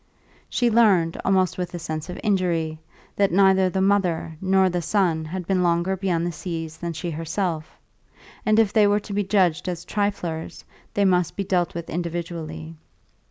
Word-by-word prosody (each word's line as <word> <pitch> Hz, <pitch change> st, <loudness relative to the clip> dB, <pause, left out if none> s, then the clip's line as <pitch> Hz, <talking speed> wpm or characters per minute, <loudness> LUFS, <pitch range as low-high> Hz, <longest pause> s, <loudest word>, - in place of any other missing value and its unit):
She 240 Hz, -2 st, +1 dB
learned, 195 Hz, -8 st, +3 dB
almost 185 Hz, -2 st, +2 dB
with 180 Hz, 0 st, -3 dB
a -, -, -2 dB
sense 160 Hz, -1 st, -5 dB
of 180 Hz, -, -6 dB
injury, 170 Hz, -6 st, 0 dB, 0.4 s
that 200 Hz, -2 st, +3 dB
neither 190 Hz, 0 st, +4 dB
the 190 Hz, +1 st, -1 dB
mother 185 Hz, -5 st, +1 dB
nor 190 Hz, 0 st, +3 dB
the 180 Hz, -1 st, -1 dB
son 170 Hz, -3 st, +1 dB
had 180 Hz, +3 st, -5 dB
been 185 Hz, 0 st, +1 dB
longer 175 Hz, +2 st, +1 dB
beyond 180 Hz, -3 st, -1 dB
the 175 Hz, -, -1 dB
seas 165 Hz, -1 st, -5 dB
than 170 Hz, 0 st, -4 dB
she 170 Hz, +2 st, -4 dB
herself; 165 Hz, 0 st, -3 dB, 0.7 s
and 215 Hz, 0 st, +3 dB
if 220 Hz, -3 st, +3 dB
they 215 Hz, -3 st, +5 dB
were 205 Hz, +1 st, +3 dB
to 205 Hz, -, -8 dB
be 205 Hz, +1 st, +1 dB
judged 185 Hz, -3 st, +1 dB
as 175 Hz, -1 st, -5 dB
triflers 190 Hz, -6 st, -3 dB, 0.3 s
they 205 Hz, -, +3 dB
must 180 Hz, -3 st, +2 dB
be 200 Hz, -, -2 dB
dealt 180 Hz, -3 st, 0 dB
with 170 Hz, -1 st, -5 dB
individually. 165 Hz, -1 st, -5 dB
180 Hz, 175 wpm, -24 LUFS, 165-195 Hz, 0.7 s, they